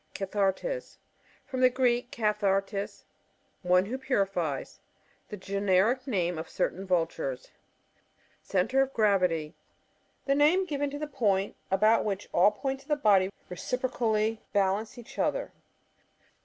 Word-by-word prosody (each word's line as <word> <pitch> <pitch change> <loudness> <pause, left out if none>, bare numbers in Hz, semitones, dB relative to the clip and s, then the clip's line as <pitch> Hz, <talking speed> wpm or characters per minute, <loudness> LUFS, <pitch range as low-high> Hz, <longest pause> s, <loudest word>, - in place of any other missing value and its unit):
Cathartes. 200 - -2 0.2
— - - -32
From 260 -1 -4
the 255 - +7
Gieek, 245 -1 +1
kaih.^ 210 -3 -1
artea^ 195 0 -1 0.6
one 180 0 +3
who 255 +6 -4
purifies. 195 - -1 0.5
The 210 - -6
gen 200 +1 -3
eric 230 +9 +3
name 180 -8 0
of 160 - -7
certain 190 +2 -2
Vultures. 165 -7 -1 0.9
Centre 195 +9 +1
op 270 0 -1
gravity. 180 -7 +2 0.4
— - - -41
The 275 - +2
name 310 +7 +4
given 290 -4 -2
to 285 - -6
the 300 - -3
point 205 -8 0
about 215 +4 +4
which 200 -1 -3
all 180 +4 +6
points 270 +6 -4
of 285 - -27
a 295 - +3
bi»dy 200 -8 +4 0.2
reciprocally 225 0 -1
bal* 195 0 +2
ance 220 +2 -10
each 240 - -11
other. - - 0
210 Hz, 140 wpm, -28 LUFS, 190-255 Hz, 0.9 s, the